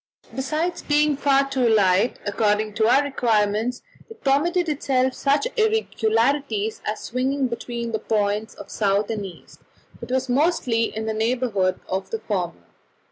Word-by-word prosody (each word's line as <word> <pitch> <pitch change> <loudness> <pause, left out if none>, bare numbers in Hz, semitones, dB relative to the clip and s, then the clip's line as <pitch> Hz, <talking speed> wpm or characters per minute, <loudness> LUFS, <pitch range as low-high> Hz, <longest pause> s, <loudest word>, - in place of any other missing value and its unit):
Besides 310 +7 -2
being 295 0 +2
far 275 0 +2
too 265 -3 +1
light, 205 +1 +3
according 210 +1 0
to 220 +1 +2
our 270 +4 +5
requirements, 230 -3 0 0.3
it 450 0 -14
permitted 340 +6 +2
itself 265 -3 +1
such 285 - +1
irregularities 240 - +1
as 215 - -3
swinging 265 +3 -1
between 235 -1 -5
the 220 - -1
points 210 0 -1
of - - -11
south 200 0 +1
and 215 -2 -3
east, 185 -4 -11 0.4
but - - -9
was 260 +1 0
mostly 250 -4 +2
in 220 0 -5
the 220 - -1
neighbourhood 220 -5 0
of 190 0 -3
the 225 - -2
former. 185 - -3
235 Hz, 145 wpm, -23 LUFS, 215-275 Hz, 0.4 s, our